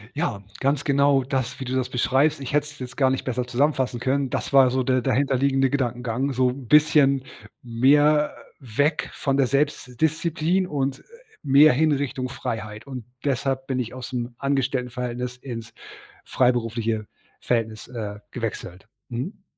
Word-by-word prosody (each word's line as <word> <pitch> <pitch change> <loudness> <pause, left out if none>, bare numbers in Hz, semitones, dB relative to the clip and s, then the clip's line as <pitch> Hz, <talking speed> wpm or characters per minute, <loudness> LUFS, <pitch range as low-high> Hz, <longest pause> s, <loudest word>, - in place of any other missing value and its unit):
Ja, 140 -11 -2 0.2
ganz 140 +1 +1
genau 140 -1 +3
das, 130 -2 -2
wie 130 - -5
du 130 - -4
das 130 -1 0
beschreibst, 135 +5 +2
ich 135 0 -6
hätte 150 0 +2
es 150 0 -10
jetzt 125 -2 -8
gar 135 -2 +4
nicht 130 - -2
besser 125 -1 -2
zusammenfassen 130 -1 0
können. 135 +1 0
Das - - -3
war 135 -2 +7
so 130 +1 0
der 130 0 +1
dahinterliegende 135 +1 +2
Gedankengang. 125 0 -1
So 125 0 +2
'n 125 -1 -7
bisschen 145 -2 +5 0.4
mehr 145 +5 +3 0.2
weg 140 +5 0
von 135 -1 -1
der 135 -2 +3
Selbstdisziplin 155 +6 0
und, 135 -3 -2
äh, - - -21 0.4
mehr 145 +1 +6
hin 155 +3 +3
Richtung 135 -2 -2
Freiheit. 105 -1 -5
Und 130 -5 -7 0.2
deshalb 135 -1 -1
bin 130 -1 -2
ich 120 0 -4
ausm 125 -1 -5
Angestelltenverhältnis 125 -2 -2
ins 115 -3 -8 0.5
freiberufliche 115 -3 0 0.3
Verhältnis, 110 -2 -2
äh, 105 -4 -6
gewechselt. 105 -6 -6 0.2
Mhm. 175 - -5
130 Hz, 150 wpm, -24 LUFS, 120-140 Hz, 0.5 s, war